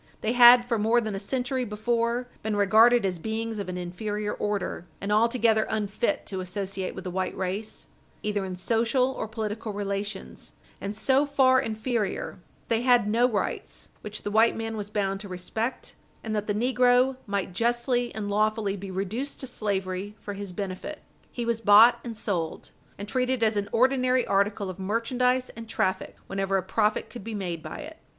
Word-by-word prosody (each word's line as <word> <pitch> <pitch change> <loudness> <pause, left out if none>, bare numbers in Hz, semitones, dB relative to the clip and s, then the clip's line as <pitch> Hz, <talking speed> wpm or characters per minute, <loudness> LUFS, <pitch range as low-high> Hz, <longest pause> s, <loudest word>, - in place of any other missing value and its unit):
They 220 - 0
had 245 0 +8
for 235 -2 0
more 225 +3 +3
than 215 -3 -3
a 195 - -3
century 255 +4 -1
before 235 +2 -1
been 215 -1 -1
regarded 220 +3 +5
as 180 -3 -1
beings 220 +3 -3
of 195 -2 -4
an 180 - -4
inferior 205 +4 -3
order, 205 -4 -3
and 200 - -3
altogether 225 0 +3
unfit 215 +6 -1
to 190 - -4
associate 190 0 -4
with 190 - -7
the 180 - -4
white 185 +1 -2
race 195 +3 -3 0.4
either 210 -1 -1
in 185 -1 -4
social 235 +7 +1
or 225 - -4
political 220 0 -4
relations, 200 0 -5 0.3
and 200 +1 -4
so 270 +6 +2
far 260 -2 +4
inferior 220 -4 -2
that - - -34
they 230 -1 +2
had 245 -3 +4
no 235 +4 +3
rights 215 - -3
which 210 0 -7
the 205 - -3
white 220 +2 +4
man 225 0 -4
was 205 -1 -5
bound 195 -2 -1
to 200 -1 -8
respect, 200 +7 -4 0.3
and 220 -1 -3
that 210 0 -2
the 205 - 0
negro 250 +2 +3
might 200 -2 -2
justly 240 +3 +1
and 215 -2 -3
lawfully 210 0 +1
be 195 0 -7
reduced 200 +9 -3
to - - -4
slavery 200 -4 -3
for 205 - -7
his 200 -1 -6
benefit. 195 +11 -5 0.3
He 240 - -4
was 230 -1 -1
bought 220 +3 +7
and 230 -3 -6
sold, 175 -7 -3 0.3
and 205 - -6
treated 255 0 0
as 220 -1 +3
an 205 0 -1
ordinary 255 0 +3
article 200 +1 +1
of 185 0 -7
merchandise 250 +5 0
and 230 -1 -10
traffic 190 - -1
whenever 195 0 -1
a 185 - -1
profit 210 +2 0
could 240 - -8
be 225 +1 -5
made 175 -5 -3
by - - -7
it. - - -10
215 Hz, 185 wpm, -27 LUFS, 200-240 Hz, 0.4 s, had